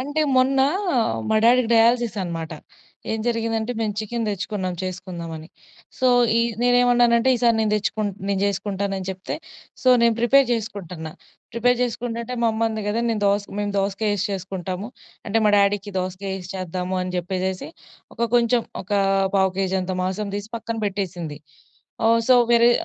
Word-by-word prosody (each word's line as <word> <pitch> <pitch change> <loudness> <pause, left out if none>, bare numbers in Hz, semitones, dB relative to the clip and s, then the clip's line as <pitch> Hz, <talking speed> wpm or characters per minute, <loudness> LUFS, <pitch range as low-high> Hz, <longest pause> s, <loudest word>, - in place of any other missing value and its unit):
అంటే 290 +4 -2 0.2
మొన్న 265 +1 +3 0.7
మా 220 - +3
డ్యాడీకి 240 0 +5
డయాలిసిసనమాట. 210 -9 +1 0.6
ఏం 220 - -1
జరిగిందంటే 230 0 -1
మేము 215 -2 0
చికెన్ 230 +2 -3
తెచ్చుకున్నాం 195 -2 -3
చేసుకుందామని. 175 -3 -6 0.5
సో 260 - +2 0.3
ఈ - - +4 0.2
నేనెమన్నానంటే 245 0 +4
ఈసారి 235 -1 +3
నేను 215 -1 +1
దెచ్చుకున్ 210 0 -1 0.2
నేను 200 -1 0
జెసుకుంటాను 200 0 -2
అని 185 - -6
చెప్తే 190 0 -5 0.5
సో 255 - +3
నేను 235 -1 +4
ప్రిపేర్ 265 +3 +5
జెసుకుంటున్న. 190 -7 -4 0.4
ప్రిపేర్ 245 +2 +2
జెసుకుంటుంటే 235 0 -3
మా - - +4
అమ్మ 220 - -2
అంది 220 -1 -4
గదా 225 +3 0
నేను 220 -2 -1
దోస 200 +1 +2 0.2
మేము 205 0 -1
దోసకాయేసి 200 0 0
చేసుకుంటాము. 190 +1 -4 0.4
అంటే 220 +1 +1
మా 210 - +5
డ్యాడీకి 200 0 +1
దోసకాయేసి 185 0 -4
చేద్దాము 185 0 -3
అని 180 - -4
జెప్పేసేసి 185 +1 -3 0.5
ఒక 235 - -4
కొంచెం 240 0 +4 0.2
ఒక 190 - -24 0.5
పావు 190 -1 +3
కేజంత 190 -1 -1
మాంసం 200 +2 -2
తీసి 205 +2 -5
పక్కన 230 0 -5
బెట్టేసింది. 180 -7 -4 0.7
ఆహ్ 230 0 +4
సో 255 - +7 0.2
వేరే 235 +1 +6
205 Hz, 145 wpm, -23 LUFS, 185-235 Hz, 0.7 s, సో